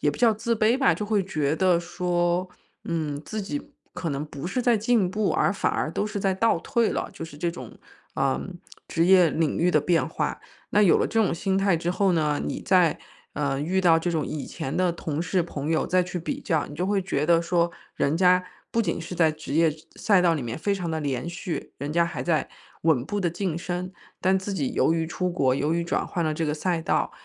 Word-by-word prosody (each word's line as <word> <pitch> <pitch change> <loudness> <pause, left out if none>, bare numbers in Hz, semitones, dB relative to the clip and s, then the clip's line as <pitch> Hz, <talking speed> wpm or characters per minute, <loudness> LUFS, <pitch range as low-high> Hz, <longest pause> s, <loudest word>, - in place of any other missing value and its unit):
也 145 - +2
不 - - -8
叫 230 -2 +4
自 230 +2 -1
卑 220 +3 +3
吧， 270 - +4
就 210 - -4
会 210 -2 +2
觉 155 -5 -1
得 180 -1 +3
说： 175 +1 -1 0.4
“嗯， 155 -4 -2
自 215 -1 -4
己 145 -6 -3 0.3
可 165 - -4
能 140 +2 -2
不 145 +1 -7
是 250 +7 -1
在 240 -1 +4
进 215 -3 +2
步， 210 0 0
而 200 - +2
反 - - 0
而 155 - -1
都 205 - -1
是 205 -1 -4
在 195 -1 +1
倒 230 +4 +2
退 235 -2 +1
了。” - - -2
就 - - -9
是 145 -3 -11
这 170 +1 0
种， 130 -8 -10 0.4
呃， 135 -1 +1 0.5
职 165 0 +1
业 180 -2 +6
领 160 -2 0
域 180 +2 +3
的 155 - +4
变 165 +3 +2
化。 - - -3 0.3
那 210 - +3
有 180 - +6
了 - - +1
这 225 0 +2
种 200 - +1
心 190 +2 -1
态 195 -3 +3
之 170 +2 -2
后 195 0 +2
呢， 150 -3 +1
你 - - -3
再， 180 -5 +3 0.4
呃， 140 -2 -1
遇 185 +5 0
到 170 -3 +5
这 175 +2 -1
种 160 -3 -1
以 150 - -4
前 135 - -5
的 180 -1 +2
同 160 -1 -3
事、 180 +1 +1
朋 150 -2 -4
友， 160 - +1
再 185 0 +3
去 180 0 -4
比 280 - -4
较， 160 - 0
你 145 - -10
就 180 - -2
会 200 0 +1
觉 165 -6 -1
得 170 0 +4
说， 170 0 +1 0.2
人 145 +3 +1
家 180 0 +4 0.3
不 230 - +2
仅 170 -4 -2
是 170 +2 -6
在 165 -2 +4
职 155 -2 -7
业 160 -1 +4 0.2
赛 200 -4 +3
道 170 -2 +3
里 145 - -3
面 115 +4 -4
非 200 +4 0
常 175 -4 -3
地 160 - -1
连 140 -1 -2
续， 175 0 -5
人 145 +2 -4
家 170 0 +3
还 170 - -4
在 165 -3 0 0.3
稳 155 -7 +3
步 205 +5 -3
地 175 -3 +1
晋 175 -2 -2
升。 180 +1 -4 0.3
但 190 +1 +3
自 195 +1 -5
己 255 +5 -2
由 - - +3
于 165 -1 0
出 180 +2 -2
国， 135 -7 +2
由 150 +3 0
于 170 0 0
转 - - -1
换 175 - -2
了 155 -1 0
这 160 - -1
个 150 - 0
赛 165 +1 -1
道， - - 0
175 Hz, 260 characters per minute, -25 LUFS, 155-190 Hz, 0.5 s, 业